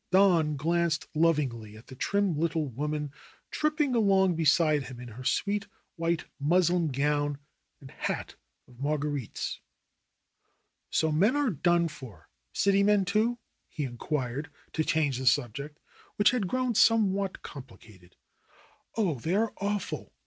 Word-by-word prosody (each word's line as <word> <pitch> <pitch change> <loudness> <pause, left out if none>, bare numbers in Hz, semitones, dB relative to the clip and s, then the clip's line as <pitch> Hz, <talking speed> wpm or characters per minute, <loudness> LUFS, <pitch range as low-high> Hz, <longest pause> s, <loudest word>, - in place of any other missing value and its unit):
Don 175 -6 +4
glanced 165 +2 0
lovingly 135 -10 0
at 110 - -15
the - - -12
trim 200 +6 0
little 160 0 0
woman 150 +3 -3 0.4
trip 305 0 0
ping 290 -5 +2
along 195 -5 +4
beside 155 -2 +3
him 125 -1 -9
in 125 -1 -8
her 120 +4 -9
sweet 200 +8 0 0.3
white 165 0 -1
muslin 175 +3 +3
gown 145 +1 0 0.4
and 135 -2 -13
hat - - -4 0.3
of 125 -1 -19
marguerites. 145 -3 -2 1.3
"So 160 -1 +1
men 200 - +3
are 290 -5 +2
done 175 +1 +2
for 125 - -12
— - - -50
city 200 0 +3
men, 205 -1 +3
too 215 +5 +1 0.2
?" - - -49
he 150 - -1
inquired 135 +2 -3 0.2
to 155 - +1
change 155 -5 +1
the 130 - -3
subject, 140 +4 0 0.4
which 205 - +4
had 240 -7 0
grown 255 +2 0
somewhat 200 -4 +3
compli 130 -4 -10
cated. 90 -5 -18 0.8
"Oh, 180 - 0
they 165 +10 -1
are 220 +2 +1
awful! 200 0 -3
160 Hz, 145 wpm, -28 LUFS, 140-195 Hz, 1.3 s, Don